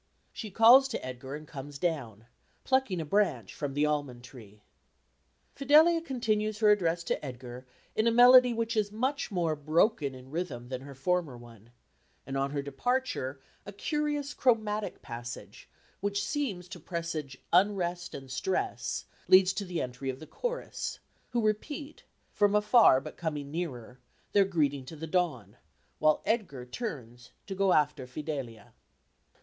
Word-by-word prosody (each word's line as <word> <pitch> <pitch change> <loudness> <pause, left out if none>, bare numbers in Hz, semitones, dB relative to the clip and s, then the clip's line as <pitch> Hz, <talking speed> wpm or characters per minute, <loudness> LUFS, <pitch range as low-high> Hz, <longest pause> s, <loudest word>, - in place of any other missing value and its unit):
She 215 - -6
calls 235 +6 +7
to 255 - -5
Edgar 130 +2 -6
and 155 0 -9
comes 140 +1 -8
down, 135 - -3 0.4
plucking 260 -9 +1
a 160 - -3
branch 150 - 0
from 140 -2 -4
the 145 +1 +3
almond 145 -5 -2
tree. 105 -5 -14 0.9
Fidelia 310 +4 +5
continues 215 -8 -1
her 215 -1 +5
address 170 -4 +1
to - - -2
Edgar 125 -1 -8 0.3
in 220 +1 +2
a - - +4
melody 250 +1 +8
which 230 0 -2
is 210 -2 +1
much 260 +7 -1
more 170 -6 0
broken 155 - +1
in 130 +1 -13
rhythm 155 -8 -4
than 130 -1 -4
her 140 0 -10
former 155 -1 -1
one; 115 -2 -15 0.6
and 135 - -5
on 135 0 0
her 140 0 -3
departure 145 - -2 0.2
a 200 - -8
curious 295 +5 -2
chromatic 215 -4 0
passage, 120 -1 -8 0.3
which 200 0 -1
seems 210 - -2
to 175 - -8
presage 165 -5 -5 0.2
unrest 180 -2 +1
and 135 -1 -9
stress, 190 - -2 0.2
leads 185 0 +6
to 200 - -3
the 175 -2 -2
entry 125 +1 -5
of 130 - -3
the 155 - -9
chorus, - - -4 0.3
who 235 -3 0
repeat, 285 +8 -3 0.3
from 205 0 +3
afar 210 - +6
but - - -10
coming 150 -4 -4
nearer, 130 -7 -5 0.3
their 200 -1 +5
greeting 145 -7 0
to 145 +5 -10
the 160 +1 -6
dawn, 150 - -1 0.4
while 155 0 +3
Edgar 190 - -1
turns 125 - -7
to 195 - -5
go 195 0 +2
after 145 -5 +2
Fidelia. 130 -4 -6
170 Hz, 155 wpm, -30 LUFS, 135-215 Hz, 0.9 s, melody